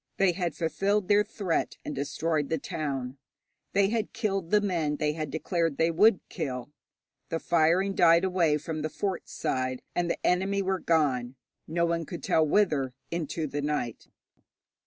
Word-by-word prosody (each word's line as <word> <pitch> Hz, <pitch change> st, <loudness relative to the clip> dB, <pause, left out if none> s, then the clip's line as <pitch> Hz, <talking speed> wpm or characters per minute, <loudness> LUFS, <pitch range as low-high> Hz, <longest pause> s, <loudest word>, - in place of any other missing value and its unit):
They 195 Hz, -2 st, +4 dB
had 175 Hz, -3 st, -2 dB
fulfilled 195 Hz, +4 st, 0 dB
their 205 Hz, 0 st, +5 dB
threat 195 Hz, -5 st, -2 dB
and -, -, -3 dB
destroyed 145 Hz, +2 st, -1 dB
the 160 Hz, -, +1 dB
town. 135 Hz, -3 st, -4 dB, 0.5 s
They 195 Hz, 0 st, +3 dB
had 225 Hz, -1 st, -2 dB
killed 195 Hz, -6 st, -1 dB
the 210 Hz, -, +5 dB
men 170 Hz, -7 st, 0 dB
they 150 Hz, 0 st, 0 dB
had 155 Hz, -1 st, -4 dB
declared 165 Hz, 0 st, -1 dB
they 165 Hz, +1 st, +3 dB
would 200 Hz, +4 st, +4 dB
kill. 135 Hz, -5 st, -4 dB, 0.6 s
The 165 Hz, -, -1 dB
firing 170 Hz, +4 st, +2 dB
died 170 Hz, -1 st, +5 dB
away 175 Hz, -5 st, +2 dB
from 155 Hz, +1 st, -5 dB
the 155 Hz, -, -2 dB
fort 190 Hz, +2 st, -3 dB
side, 130 Hz, -1 st, -2 dB
and 175 Hz, -1 st, 0 dB
the -, -, -3 dB
enemy 195 Hz, +2 st, +2 dB
were 190 Hz, 0 st, 0 dB
gone, 135 Hz, -8 st, +1 dB, 0.3 s
no 170 Hz, +2 st, +1 dB
one 165 Hz, -2 st, -1 dB
could 170 Hz, -5 st, -7 dB
tell 160 Hz, -, +3 dB
whither, 150 Hz, -7 st, +2 dB, 0.2 s
into 165 Hz, -1 st, -2 dB
the 145 Hz, 0 st, -3 dB
night. 145 Hz, -6 st, -3 dB
165 Hz, 165 wpm, -28 LUFS, 150-190 Hz, 0.6 s, their